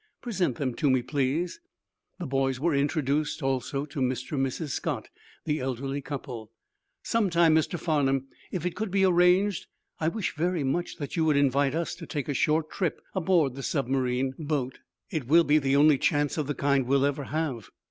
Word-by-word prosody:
Present 185 - -1
them 130 -2 -2
to 150 - +2
me, 130 -2 +3
please." 145 - -1 0.6
The 180 - -5
boys 135 -1 0
were 165 +3 +1
introduced, 145 +1 0
also, 135 +1 -1
to 145 -1 -7
Mr. 125 -1 -1
and 135 -3 0
Mrs. 150 +4 -5
Scott, - - -3 0.4
the 150 -1 0
elderly 135 +2 -3
couple. 125 -6 -6 0.5
"Some 225 -4 +1
time, 170 -2 +4
Mr. 160 +2 +1
Farnum, 140 -5 +1 0.3
if 180 -3 -3
it 180 - -2
could 220 0 -3
be 195 +1 +3
arranged, 180 +2 +3 0.3
I 160 - 0
wish 205 +4 -2
very 170 0 0
much 170 +7 -1
that 145 -4 -6
you 165 - +2
would 150 -2 +3
invite 140 0 +2
us 170 0 -2
to 165 0 -9
take 145 -4 -3
a 145 - -1
short 155 +4 +1
trip 180 -5 -1
aboard 170 -7 +2
the 135 - -7
submarine 130 -1 0
boat. 145 -4 -2 0.3
It 155 -9 -3
will 165 +4 +6
be 150 0 +4
the 135 -1 +1
only 145 -1 +5
chance 145 +1 +1
of 150 -4 -2
the 145 - -2
kind 140 -2 +1
we'll 140 +1 +3
ever 145 0 -1
have." 140 -6 -3
145 Hz, 190 wpm, -27 LUFS, 135-165 Hz, 0.6 s, will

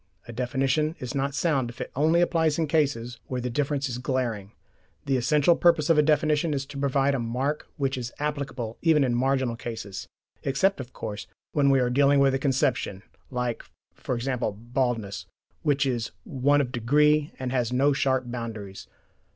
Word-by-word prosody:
A 120 - -7
definition 135 +5 0
is 125 0 -6
not 140 0 -1
sound 135 -5 +1
if 120 - -12
it - - -5
only 160 +5 +3
applies 160 -3 +2
in 165 - +1
cases 135 -6 0
where 125 - -3
the 125 0 -3
difference 140 +1 0
is 125 -1 -4
glaring: 120 -6 -2 0.5
the 135 -1 +1
essential 150 +6 +3
purpose 165 -2 +3
of 165 - +4
a - - +8
definition 150 +1 +2
is 135 0 -2
to 140 0 -9
provide 140 0 +2
a 135 - 0
mark 130 +6 -2
which 135 -2 -1
is 120 0 -5
applicable 140 -6 -4
even 160 -4 +4
in 125 -2 +1
marginal 130 -1 +1
cases 110 -5 -6 0.3
except, 140 +8 +1
of 130 -1 -7
course, 105 -5 -6 0.2
when 140 -2 +3
we 135 -1 +4
are 125 -1 +1
dealing 140 +2 +4
with 135 -1 +4
a 135 - 0
conception, 130 -7 0 0.3
like, 125 -2 -2 0.5
e.g. 125 +2 -1
baldness, 115 -3 -2 0.3
which 145 -1 +2
is 120 -4 -1
one 145 +1 +2
of 125 -3 -3
degree 150 +6 +3
and 130 -1 -3
has 125 -2 0
no 140 +3 +3
sharp 130 -1 +1
boundaries. 115 -5 -6
135 Hz, 175 wpm, -26 LUFS, 120-145 Hz, 0.5 s, a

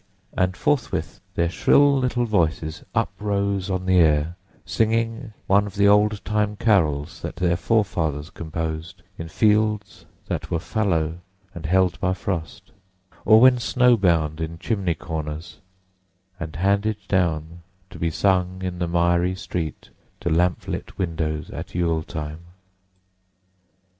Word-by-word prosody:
and 95 -1 0
forthwith 145 -4 -1 0.2
their 85 - +2
shrill 140 +11 +4
little 125 -2 0
voices 80 -7 -1
uprose 100 -2 -1
on 95 -1 -2
the 95 -1 +4
air, 80 0 +3 0.3
singing 115 +4 0
one 100 +1 +3
of 100 - -9
the 100 0 +4
old 105 0 +3
time 105 -1 0
carols 80 -10 +1
that - - -5
their 85 -1 +1
forefathers 85 -8 0
composed 80 +2 -5 0.2
in 80 - -5
fields 105 +2 +1 0.2
that - - -4
were 85 - 0
fallow 85 -4 -1 0.3
and 80 -2 -6
held 95 +1 +2
by 90 0 0
frost, 85 -4 -5 0.5
or 110 +1 +7
when 125 0 +6
snow 125 0 +4
bound 85 -6 +1
in 80 +1 -4
chimney 95 -3 -1
corners, 80 -2 -6 0.8
and 80 -3 -6
handed 100 +5 +1
down 85 -3 0 0.3
to - - -10
be 85 - 0
sung 95 +1 0
in 90 -1 -4
the 85 - -1
miry 85 +1 +2
street 85 -5 -5 0.3
to 85 - -2
lamp 90 +2 +1
lit - - -5
windows 80 -2 -2
at - - -8
Yule 85 -2 +1
time. 75 0 -6
90 Hz, 135 wpm, -23 LUFS, 80-105 Hz, 0.8 s, or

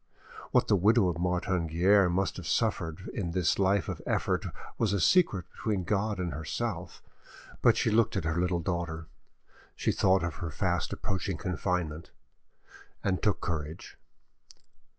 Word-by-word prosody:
What - - +3
the - - +4
widow 100 +1 +4
of 85 -1 -3
Martin 90 -1 0
Guerre 90 +4 +4
must 95 +2 0
have - - -7
suffered 80 +2 -1
in 90 -6 -3
this 90 -1 +1
life 100 0 +2
of - - -4
effort - - 0 0.3
was 105 -3 +2
a 100 - +1
secret 110 - +3
between 105 -4 -2
God 105 +3 0
and 90 -4 -2
herself, 75 +1 -4 0.6
but - - +5
she 110 - +2
looked 110 -2 +3
at 95 - -1
her 80 +2 0
little 90 -1 0
daughter, 85 -2 -3 0.7
she - - 0
thought 95 -1 +3
of 85 -3 -3
her 85 - -4
fast 75 - -1
approaching 95 -2 -2
confinement, 90 -4 -2 0.9
and 95 -2 0
took 105 - +1
courage. 80 -1 -4
90 Hz, 150 wpm, -29 LUFS, 85-100 Hz, 0.9 s, but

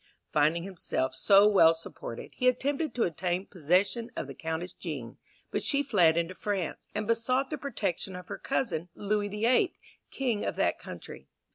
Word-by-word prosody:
Finding 155 +3 +3
himself 175 -8 -1
so 200 0 +6
well 165 -6 +6
supported, 160 -7 -7
he 255 - 0
attempted 275 +4 +1
to 240 - +2
obtain 175 +2 -1
possession 195 +8 +1
of - - -3
the 140 - -8
Countess 160 +5 -4
Jean, 135 -9 -6 0.3
but - - -1
she 285 -1 +2
fled 175 - +4
into 170 +2 0
France, 195 -4 -3
and - - -1
besought 255 +5 +1
the 305 - -1
protection 195 -9 -3
of 180 0 -8
her - - -6
cousin, 180 - -1
Louis 205 0 0
the 210 +2 -2
Eighth, 255 +10 +3 0.3
king 245 -6 -1
of - - -2
that - - +1
country. - - -9
195 Hz, 170 wpm, -29 LUFS, 165-235 Hz, 0.3 s, so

